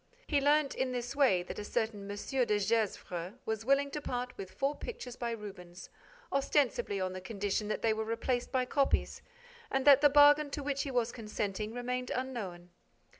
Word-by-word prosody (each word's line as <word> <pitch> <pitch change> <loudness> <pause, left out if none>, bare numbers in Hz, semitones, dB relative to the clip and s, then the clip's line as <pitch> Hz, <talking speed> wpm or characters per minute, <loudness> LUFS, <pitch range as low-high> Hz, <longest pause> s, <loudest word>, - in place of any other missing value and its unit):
He 290 -3 +1
learnt, 290 0 +3
in 260 -1 -1
this 245 +2 -4
way, 250 -11 +4
that 180 - -7
a - - -4
certain 205 -1 -2
M. 205 - -4
de 240 -2 0
Gesvres 195 -4 -1
was 220 -1 -2
willing 275 +3 +2
to 300 - -4
part 245 -2 -4
with 190 -1 -7
four 275 +2 0
pictures 255 - -7
by 240 -1 -3
Rubens, 195 -5 -8 0.4
ostensibly 270 -7 +1
on 185 0 -2
the 185 - -6
condition 205 +1 -2
that 215 - -3
they 225 -1 +3
were 220 0 -2
replaced 230 +2 -2
by 255 -1 +1
copies 275 +2 +1 0.5
and 270 0 0
that 280 -1 +8
the 290 - +7
bargain 290 +1 +6
to 285 0 -4
which 280 0 -1
he 280 - -3
was 245 -3 0
consenting 210 -2 -3
remained 250 +1 -3
unknown. 200 -9 -5
240 Hz, 185 wpm, -32 LUFS, 205-275 Hz, 0.5 s, that